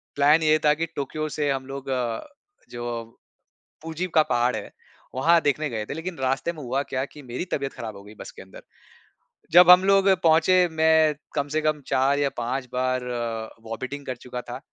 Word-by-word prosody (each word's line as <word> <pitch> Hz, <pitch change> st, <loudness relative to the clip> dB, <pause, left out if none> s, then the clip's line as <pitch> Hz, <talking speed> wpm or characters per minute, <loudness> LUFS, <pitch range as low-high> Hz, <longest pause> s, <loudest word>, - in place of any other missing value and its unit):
Plan 150 Hz, +3 st, +4 dB
ये 155 Hz, 0 st, +4 dB
था 150 Hz, -, +6 dB
कि 165 Hz, +2 st, -2 dB
टोक्यो 155 Hz, +2 st, -3 dB
से 145 Hz, -1 st, -2 dB
हम 135 Hz, -1 st, -3 dB
लोग 135 Hz, 0 st, -7 dB
अ, 120 Hz, -3 st, -1 dB, 0.5 s
जो 120 Hz, -1 st, -5 dB, 0.8 s
पूजी 165 Hz, +3 st, -4 dB
का 155 Hz, -, +6 dB
पहाड़ 120 Hz, -1 st, +1 dB
है, -, -, -7 dB, 0.4 s
वहाँ 165 Hz, +6 st, +4 dB
देखने 145 Hz, +1 st, 0 dB
गए 110 Hz, -2 st, -4 dB
थे -, -, -6 dB
लेकिन 165 Hz, +3 st, -6 dB
रास्ते 130 Hz, +5 st, -1 dB
में 155 Hz, -, -10 dB
हुआ 130 Hz, +3 st, -1 dB
क्या 130 Hz, -1 st, -3 dB
कि 150 Hz, +1 st, -14 dB
मेरी 125 Hz, +8 st, -5 dB
तबियत 135 Hz, -1 st, -2 dB
खराब 110 Hz, -3 st, -7 dB
हो 100 Hz, -, -13 dB
गई 105 Hz, +1 st, -13 dB
बस -, -, -8 dB
के -, -, -13 dB
अंदर। 95 Hz, -, -13 dB, 0.9 s
जब 180 Hz, +1 st, +8 dB
हम 180 Hz, +1 st, +9 dB
लोग 195 Hz, 0 st, +4 dB, 0.2 s
पहुँचे 170 Hz, +3 st, +4 dB
मैं 160 Hz, -1 st, +3 dB, 0.2 s
कम 145 Hz, -1 st, 0 dB
से 155 Hz, -, +2 dB
कम 155 Hz, -1 st, 0 dB
4 135 Hz, +2 st, +2 dB
या 140 Hz, -, +1 dB
5 125 Hz, +2 st, -3 dB
बार 130 Hz, 0 st, 0 dB, 0.6 s
वोमिटिंग 130 Hz, +5 st, -6 dB
कर 130 Hz, -, -4 dB
चुका 125 Hz, 0 st, -7 dB
था, 120 Hz, +1 st, -8 dB
140 Hz, 195 wpm, -24 LUFS, 125-160 Hz, 0.9 s, हम